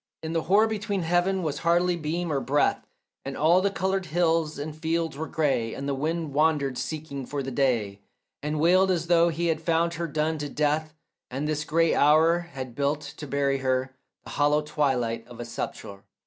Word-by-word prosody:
In 160 +1 -3
the 165 - +1
hoar 205 +6 +4
heaven 190 -3 0
was 150 -3 -2
hardly 175 +1 +2
beam 170 +1 -3
or 140 - +1
breath, 135 +3 +1 0.4
And 135 0 -5
all 170 +4 +4
the 200 - +2
coloured 190 -1 -1
hills 165 -1 +1
and 150 +1 -5
fields 165 0 -1
were 160 +3 -4
grey, 135 -7 0
And 140 - -5
the 140 - 0
wind 155 +2 -2
wandered 145 -3 +1
seeking 150 -3 -5
for 140 +2 -4
the 135 - -4
day, 115 -7 0 0.4
And 150 +1 -2
wailed 185 +4 +4
as 170 -3 0
though 170 0 +4
he 170 +1 -2
had 160 -1 0
found 165 +1 +1
her 170 0 -3
done 155 +1 -1
to 145 0 -4
death 155 +2 -1 0.3
And 135 +4 -3
this 150 0 -1
grey 165 +1 +2
hour 160 +4 +4
had 135 -8 -7
built 145 +3 0 0.2
to 150 - -7
bury 140 0 0
her 130 0 -1 0.3
The - - -10
hollow 145 +1 +2
twilight 125 -7 -1
for 120 -1 -12
a 120 - -4
sepulchre. 100 -3 -6
155 Hz, 190 wpm, -26 LUFS, 140-170 Hz, 0.4 s, hoar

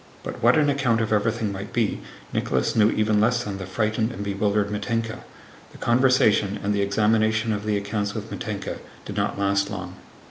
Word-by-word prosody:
But - - -6
what 120 +4 +5
an 150 -1 +4
account 135 -5 +2
of 110 -1 0
everything 110 0 0
might 100 +1 -6
be 115 -4 0 0.3
Nicholas - - 0
knew 110 -1 +5
even 105 -1 +2
less 120 +2 +2
than 100 -2 -5
the 95 - -6
frightened 110 +3 0
and 100 -2 -5
bewildered 100 +1 0
Mítenka. 115 +1 -2 0.5
The - - -12
conversation 120 -5 +3
and 105 +1 +1
the 100 - +1
examination 110 +2 +2
of 105 0 -4
the 105 -1 +1
accounts 100 0 -2
with - - -6
Mítenka - - -4 0.3
did - - -6
not - - -1
last 100 0 +1
long. 100 -4 -6
105 Hz, 185 wpm, -24 LUFS, 100-115 Hz, 0.5 s, what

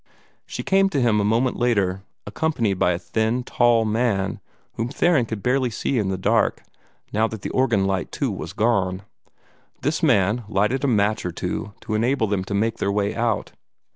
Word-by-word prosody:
She - - -5
came 195 0 +3
to 145 - -1
him 115 -4 +3
a - - +2
moment 115 +5 +1
later, 100 -6 +1 0.2
accompanied 115 - -1
by 90 - +3
a - - -2
thin, 110 +6 -1
tall 120 -2 +3
man, 110 -3 0 0.3
whom 115 +2 -3
Theron 145 -3 +2
could 110 -3 -5
barely 125 0 +2
see 120 +3 -1
in 100 -3 0
the 95 - -1
dark, 95 - +1 0.5
now 110 +1 +2
that 110 -3 -8
the - - -3
organ 115 -7 +2
light 95 -1 -1
too - - -1
was - - -6
gone. 100 -4 0 0.8
This 150 +3 -1
man 115 - +2
lighted 105 +7 +1
a - - +2
match 110 -2 +1
or 90 - -3
two 100 +4 -4
to 110 - -5
enable 115 +3 +1
them 100 -3 -1
to 100 - -3
make 110 +3 0
their 100 - 0
way 100 0 0
out. 115 -2 -1
110 Hz, 190 wpm, -23 LUFS, 100-120 Hz, 0.8 s, came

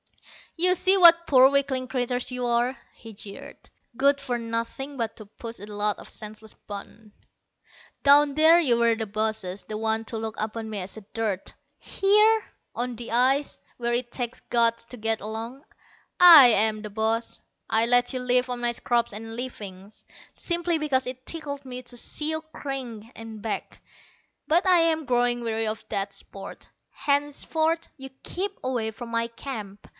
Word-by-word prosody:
"You 365 +2 +3
see 380 +2 +4
what 340 -2 +7
poor 265 -1 +7
weakling 270 -2 0
creatures 250 -1 -2
you 250 0 -3
are," 240 +2 +1 0.2
he 225 -2 -13
jeered. 200 0 -11 0.3
"Good 280 +2 +3
for 255 -3 -3
nothing 230 +5 -4
but 230 -2 -3
to 215 - -10
push 230 +2 -7
a 205 - -8
lot 210 0 -1
of - - -12
senseless 215 0 -9
buttons. 210 +1 -11 0.9
Down 285 0 +6
there 320 +2 +6
you 255 -8 +2
were 235 -1 +3
the 220 0 -3
bosses, 210 -2 -3
the 215 - -6
ones 220 0 -1
to 225 - -3
look 220 0 -5
upon 220 +1 -4
me 210 -2 -4
as 190 +3 -6 0.2
dirt. 215 -4 -3 0.3
Here, 425 +3 +3 0.3
on 245 0 -3
the 235 0 -8
ice, 265 +4 +1 0.2
where 240 0 -1
it 240 0 -2
takes 245 -1 -4
guts 230 -1 +2
to 250 +1 -10
get 225 0 0
along, 225 +6 -6 0.6
I 335 -7 +11
am 215 -1 +3
the 210 - -7
boss. 220 +2 -1 0.3
I 220 +1 +3
let 245 +1 +3
you 255 - -2
live 250 0 +1
on 245 -1 -3
my 240 0 0
scraps 235 -2 0
and 225 +2 -7
leavings, 205 -5 -8 0.3
simply 345 -1 -1
because 265 -4 0
it 255 0 -7
tickled 285 -4 -5
me 255 -1 -7
to 245 0 -6
see 300 +5 0
you 315 0 -2
cringe 255 -6 -6
and 225 -2 -9
beg. 215 0 -4 0.7
But 340 +5 +3
I 365 -2 +5
am 320 -2 +2
growing 245 -1 +1
weary 225 -1 -1
of 215 +1 -4
that 200 -1 -2
sport. 195 0 -9 0.2
Henceforth 315 +3 -1
you 270 -1 -9
keep 390 +2 -4
away 245 -4 -1
from 235 +2 -9
my 230 0 0
camp. 220 -4 -8
240 Hz, 170 wpm, -25 LUFS, 220-280 Hz, 0.9 s, I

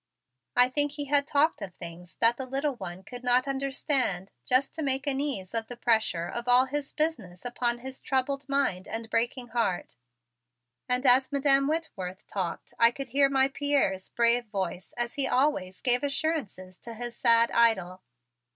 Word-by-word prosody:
I 245 0 +7
think 290 +2 -1
he 290 -1 -4
had 280 0 +3
talked 300 +3 +2
of 180 -2 -7
things 170 +1 -10
that 230 +1 +4
the 260 +1 -6
little 275 +2 -1
one 190 -5 -8
could 245 +4 -10
not 250 +2 +2
understand 265 -8 -1 0.2
just 255 +2 +2
to 320 - -5
make 270 -2 -1
an 275 -2 0
ease 245 -11 -4
of 225 -1 -1
the 245 - -9
pressure 220 -8 +1
of 240 +1 -5
all 250 +1 +6
of 265 - -7
his 290 -1 -3
business 235 - -2
upon 240 0 0
his 260 +2 -9
troubled 275 +1 -1
mind 275 -10 0
and 225 0 -6
breaking 240 +2 -1
heart. 225 -7 -2 0.9
And 250 +2 0
as 260 +2 +5
Madam 275 -1 +3
Whitworth 210 - -4
talked 185 -4 -5
I 230 - +7
could 270 +2 -7
hear 275 +2 +3
my 270 0 +3
Pierre's 275 -10 0
brave 240 +1 +2
voice 190 -3 -4
as 240 0 -2
he 275 -2 +1
always 250 -10 0
gave 245 -1 +3
assurances 275 - -2
to 230 -1 -8
his 240 +1 -6
sad 230 0 +4
idol. 190 -6 +2
245 Hz, 180 wpm, -28 LUFS, 220-275 Hz, 0.9 s, I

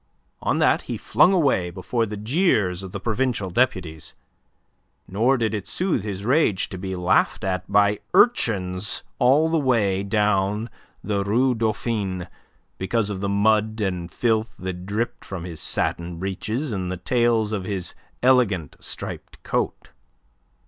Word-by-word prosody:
On - - 0
that - - +3
he - - -2
flung 180 - +4
away, 140 - +2
before 110 +6 -2
the 105 0 -5
jeers 105 - +1
of 95 -2 -7
the - - -5
provincial 110 -4 -1
deputies. 90 - -1 0.9
Nor 115 +8 +2
did 110 -2 0
it 105 -3 -4
soothe 175 - 0
his 100 -1 -5
rage 125 - +2
to 95 - -7
be 95 0 -4
laughed 90 0 +2
at 95 0 -2
by 105 0 +4 0.2
urchins 100 - +2 0.2
all 140 +6 +5
the 165 0 +1
way 110 -9 +2
down 105 +1 0 0.3
the 100 -1 0
Rue 125 +6 +2
Dauphine 110 -5 -2 0.5
because 105 +2 0
of 95 -2 -4
the 100 - -1
mud 110 +2 +2
and 90 -4 -2
filth 110 -1 0
that 90 0 -6
dripped 110 +4 -2
from 95 -3 -6
his 85 -3 -7
satin 85 0 -2
breeches 110 - -3
and 95 -3 -3
the 95 - -3
tails 115 +2 +1
of 100 -4 -2
his 95 -2 -3 0.3
elegant, 110 - +2
striped - - -7
coat. - - -2
105 Hz, 150 wpm, -23 LUFS, 95-120 Hz, 0.9 s, all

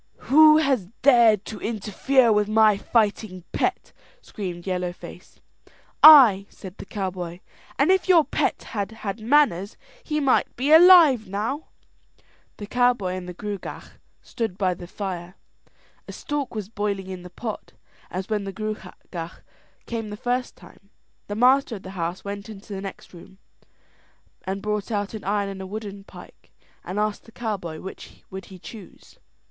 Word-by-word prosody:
"Who 305 +1 +8
has 270 - +1 0.2
dared 235 -6 +5
to 215 - -7
interfere 230 +4 +1
with 210 0 +1
my 215 -1 +4
fighting 205 -3 -1
pet?" - - -2 0.3
screamed 180 - -7
Yellow 180 -2 -2
Face. 175 - -13 0.6
"I," 245 -11 +9
said 190 -1 -12
the - - -9
cowboy; 180 -3 -5 0.4
"and - - +3
if 380 0 +1
your 335 -4 +6
pet - - -1
had 205 -2 -3
had 200 +2 -3
manners, 220 -6 +2 0.3
he 305 -1 -2
might 275 -3 +1
be 270 +5 -1
alive 320 - +7
now." 215 +10 -3 0.9
The 205 - -7
cowboy 245 -5 +1
and 185 -1 -6
the 180 - -8
Gruagach 205 -1 -7 0.2
stood 225 -7 -4
by 185 -3 +1
the 175 0 -10
fire. 180 -2 -6 0.7
A - - -7
stork 290 -5 -4
was 210 -3 -4
boiling 205 -3 -3
in 185 -1 -7
the 180 - -11
pot, 215 +4 -7 0.4
as 185 +1 -5
when 215 -2 -1
the 195 - -5
Gruagach 190 -5 -7 0.4
came 225 -2 -5
the 210 - -7
first 245 +2 -2
time. 200 - -18 0.4
The 205 - -4
master 255 +1 +3
of 195 - -10
the 190 - -8
house 175 0 -4
went 200 +1 -6
into 205 0 -10
the 190 - -5
next 195 -1 -9
room 180 +2 -14 1.1
and 195 +1 -3
brought 210 0 -2
out 205 -2 -2
an 215 - -7
iron 200 0 -1
and 195 -1 -7
a 190 - -7
wooden 200 -1 -7
pike, - - -15 0.3
and 185 - -6
asked 210 0 -2
the 225 - -16
cowboy 195 -9 -5
which 190 - -11
would 190 0 -7
he 190 - -12
choose. 200 +1 -13
205 Hz, 160 wpm, -24 LUFS, 190-235 Hz, 1.1 s, I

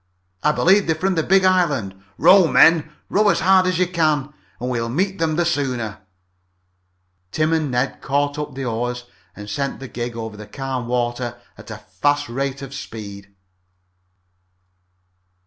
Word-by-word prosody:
I 150 - +3
believe 190 +5 +3
they're 160 - +2
from 190 +4 0
the 165 - +1
big 190 +3 +3
island. 150 - +2 0.2
Row, 190 -3 +6
men, 160 -1 +5 0.2
row 210 +1 +3
as - - +1
hard 190 -1 +4
as 185 -2 0
you 185 - +3
can 155 -5 0 0.3
and 125 +1 -3
we'll 115 -1 -2
meet 190 +9 -1
them 160 -1 0
the 175 +1 +1
sooner!" 130 -10 -2 1.3
Tim 155 +1 +1
and 155 -3 0
Ned 125 +2 -1
caught 145 +1 -1
up 150 -3 -5
the 135 -1 -4
oars 125 +1 -3 0.3
and 105 +1 -9
sent 140 +7 -3
the 135 - -7
gig 120 -1 -5
over 110 -2 -6
the 105 0 -10
calm 130 +1 -4
water 120 0 -2 0.2
at - - -14
a 105 - -6
fast 145 +10 -1
rate 135 +2 -3
of 135 0 -8
speed. 100 -5 -9
140 Hz, 165 wpm, -21 LUFS, 120-165 Hz, 1.3 s, Row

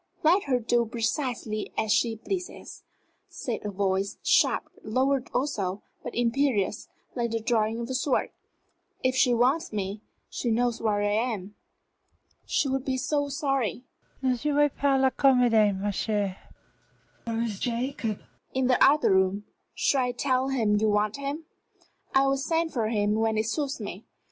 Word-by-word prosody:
"Let 350 +6 +4
her 265 -3 +2
do 240 +1 +2
precisely 230 -2 -2
as 220 -1 0
she 225 +1 +2
pleases," 360 - -6 0.5
said 275 -10 -4
a 210 - -3
voice, 195 0 -1
sharp, - - +3 0.2
lowered 260 +3 0
also, 205 -8 -2 0.2
but - - -7
imperious, 235 -4 +1 0.3
like 235 -2 -1
the 230 0 -1
drawing 225 0 0
of 235 - -4
a 260 - -4
sword. 260 +1 0 0.7
"If 255 0 +2
she 250 -1 +4
wants 265 +8 +2
me, 205 0 -3 0.3
she 240 - -3
knows 235 +1 +1
where 210 -2 +1
I 205 - +1 0.2
am." 200 0 -7 0.9
"She 285 - +1
would 270 -1 -1
be 265 -1 -1
so 285 +2 0
sorry 275 -4 -1 0.2
" - - -36
"Ne 255 -1 +2
jouez 295 +2 +2
pas 275 -1 +2
la 265 0 +3
comédie, 235 -8 +4
ma 205 +1 -1
chère! 205 -1 -1 0.9
Where 230 0 -1
is 215 -4 -4
Jacob?" 240 -2 -2 0.3
"In 260 0 +2
the 250 0 +4
other 300 -3 +5
room. 190 +2 +2 0.3
Shall 265 -3 +2
I 245 - -2
tell 260 +1 0
him 220 -6 +2
you 215 +1 +2
want 210 +3 +1
him?" 280 +3 -4 0.7
"I 270 0 +5
will 275 0 +2
send 325 +3 -1
for 230 -5 0
him 210 -2 +1
when 220 0 +1
it 215 - +1
suits 275 +4 -2
me. 205 0 -7
240 Hz, 165 wpm, -27 LUFS, 215-270 Hz, 0.9 s, other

